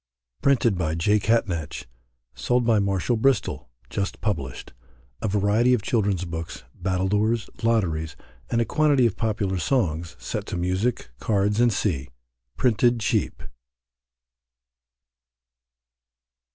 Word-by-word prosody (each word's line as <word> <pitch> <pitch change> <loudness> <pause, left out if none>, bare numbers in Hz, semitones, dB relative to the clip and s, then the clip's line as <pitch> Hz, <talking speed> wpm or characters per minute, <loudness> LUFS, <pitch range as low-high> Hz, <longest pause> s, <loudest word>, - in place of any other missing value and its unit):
Printed 120 -8 +3
by 80 -2 0
J. 105 +6 +2
Catnach, 95 - -1 0.5
Sold 125 -1 0
by 115 -2 +4
Marshall 100 +4 0
Bristol. 135 - +1 0.2
Just 100 +9 -3
Published 70 - -3 0.5
A - - -1
Variety 105 +5 +3
of 110 - -4
Children's 100 -6 0
Books, 85 -1 -6
Battledores, 105 +5 0
Lotteries, 85 -9 0 0.3
and 115 - +1
a 115 - +2
quantity 145 -4 +3
of 115 - +1
popular 105 -4 -1
Songs, 85 - 0
set - - -5
to - - -3
Music. 95 - -1
Cards, 105 +1 +1
&c., 70 -13 -1 0.5
Printed 120 0 +3
cheap. 110 - -1
105 Hz, 110 wpm, -24 LUFS, 90-115 Hz, 0.5 s, by